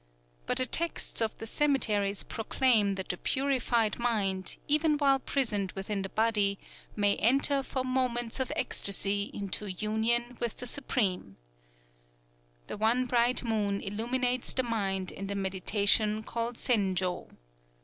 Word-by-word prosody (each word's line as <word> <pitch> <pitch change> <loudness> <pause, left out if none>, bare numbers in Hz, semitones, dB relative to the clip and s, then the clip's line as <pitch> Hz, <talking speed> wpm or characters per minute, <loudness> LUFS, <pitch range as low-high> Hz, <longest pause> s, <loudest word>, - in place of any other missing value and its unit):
But - - +1
the 255 - +4
texts 335 -1 -1
of 220 -1 0
the 225 - -7
cemeteries 215 -7 +1
proclaim 225 -3 +2
that 190 -1 -6
the 180 - -2
purified 250 -5 0
mind, 200 -6 -1
even 300 +1 +2
while 275 -2 +3
prisoned 215 -9 -1
within 195 +1 -3
the 195 - -4
body, 210 -2 +1 0.4
may 205 -1 +2
enter 275 +4 +3
for 260 -1 -3
moments 255 -2 -1
of 260 - -2
ecstasy 200 +1 +1
into 200 +1 -4
union 225 +5 0
with 235 -2 -2
the 250 - -7
Supreme: 205 - -1 1.3
"_The - - -7
One 235 +4 +2
Bright 245 +1 +2
Moon 210 -4 0
illuminates 245 +5 -1
the 260 - 0
mind 195 -5 -2
in 195 - -7
the 200 - -3
meditation 200 +3 +2
called 230 +2 -3
Zenjō. 190 -7 0
225 Hz, 135 wpm, -29 LUFS, 200-250 Hz, 1.3 s, the